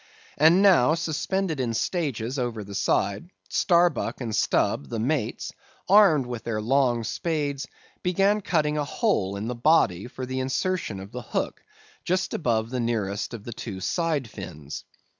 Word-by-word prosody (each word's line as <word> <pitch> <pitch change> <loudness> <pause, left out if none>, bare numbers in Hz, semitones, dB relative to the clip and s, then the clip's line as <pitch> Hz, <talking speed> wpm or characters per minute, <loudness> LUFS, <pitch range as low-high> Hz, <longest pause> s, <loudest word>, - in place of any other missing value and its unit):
And 165 +6 +6
now 165 -7 +6
suspended 165 +1 -1
in 120 -3 -1
stages 135 - -1
over 120 -4 -2
the 100 0 -10
side, 100 - 0 0.2
Starbuck 170 -9 +2
and 115 -4 -3
Stubb, 70 -1 +1
the - - -3
mates, 120 0 -1 0.3
armed 190 -9 +6
with 120 -2 -6
their 115 -2 -2
long 120 0 +2
spades, 145 +3 -2 0.3
began 195 +4 +2
cutting 150 -5 +1
a - - +1
hole 145 - 0
in 100 +3 -4
the 125 - -2
body 120 - +3
for 130 +1 -6
the 130 +1 -3
insertion 135 - -1
of 95 +2 -9
the 125 - -5
hook - - -3 0.4
just 185 +1 0
above 115 -6 0
the 130 - -2
nearest 110 -2 -2
of 105 - -9
the 120 - -7
two 100 -4 -6
side 155 - -1
fins. 80 -9 -8
130 Hz, 160 wpm, -26 LUFS, 110-165 Hz, 0.4 s, And